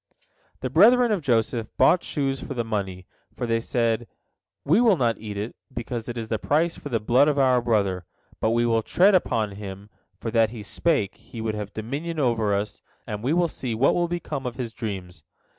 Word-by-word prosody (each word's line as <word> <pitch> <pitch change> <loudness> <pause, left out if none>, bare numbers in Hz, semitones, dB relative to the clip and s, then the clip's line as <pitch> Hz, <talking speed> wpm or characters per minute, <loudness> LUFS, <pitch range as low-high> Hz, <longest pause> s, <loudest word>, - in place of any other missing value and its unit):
The 130 - -3
brethren 235 - +6
of 205 -5 +1
Joseph 115 -3 +1
bought 175 - +5
shoes 135 -2 -2
for 135 - -6
the 120 - 0
money, 95 -5 -3 0.3
for - - -2
they 115 -1 +1
said: 115 0 0 0.6
"We 165 +11 +4
will 220 -6 +5
not 115 -5 +1
eat 105 -2 -6
it, 105 +3 -4 0.2
because 120 -1 -5
it 120 - -5
is 115 -1 -4
the 110 -1 -1
price 165 +3 +1
for 145 - -8
the 115 -4 0
blood 125 +6 +4
of 150 -1 +1
our 130 -2 +4
brother, 100 -6 0 0.3
but 110 - +1
we 120 +1 +2
will 115 -1 +2
tread 190 - +4
upon 115 - +1
him, 100 0 -8 0.3
for 115 - -4
that 115 -1 +3
he 110 -2 -8
spake, 105 - 0
he 115 - -11
would 110 -1 -2
have 105 -1 -5
dominion 140 +10 -4
over 115 -6 +1
us, 105 +1 -3 0.2
and 105 -1 -5
we 130 - +1
will 175 0 +3
see 125 -7 -4
what 130 +5 +3
will 175 0 +1
become 155 -6 -4
of 120 - -5
his 120 -4 -5
dreams." 95 -8 -6
120 Hz, 210 wpm, -25 LUFS, 110-140 Hz, 0.6 s, brethren